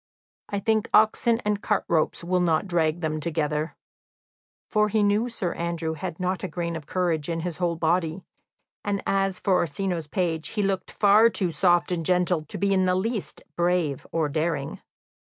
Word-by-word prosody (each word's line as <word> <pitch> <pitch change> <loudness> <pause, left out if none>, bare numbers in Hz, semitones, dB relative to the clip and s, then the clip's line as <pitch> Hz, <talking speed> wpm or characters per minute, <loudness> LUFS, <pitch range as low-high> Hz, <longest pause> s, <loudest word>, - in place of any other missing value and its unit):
I 200 - -1
think 220 +1 +1
oxen 225 +2 +4
and 210 -1 0
cart - - 0
ropes 165 0 0
will 180 +1 +1
not 165 0 +2
drag 170 -2 0
them 155 -1 -1
together." 155 -1 -2 0.9
For 210 -1 +2
he 215 0 +2
knew 210 +4 +2
Sir 190 -7 -2
Andrew 170 -1 -2
had 160 +2 -6
not 185 0 -2
a - - -1
grain 170 -2 -3
of 155 -3 -7
courage 170 -4 -1
in 165 -1 -2
his 175 -1 -4
whole 175 -2 0
body; 165 +1 0 0.6
and 200 -1 -2
as 195 -1 0
for 195 - +1
Orsino's 175 -1 -1
page, 165 -2 -1
he 210 - -2
looked 195 -1 -1
far 210 +3 +5
too 185 -6 0
soft 175 +2 +2
and 170 -2 -1
gentle 180 -2 +1
to - - -7
be 200 0 +1
in 190 -1 +2
the 180 - +2
least 215 +2 -3
brave 175 -5 0
or 160 -2 +1
daring. 150 -1 -2
180 Hz, 180 wpm, -25 LUFS, 160-195 Hz, 0.9 s, far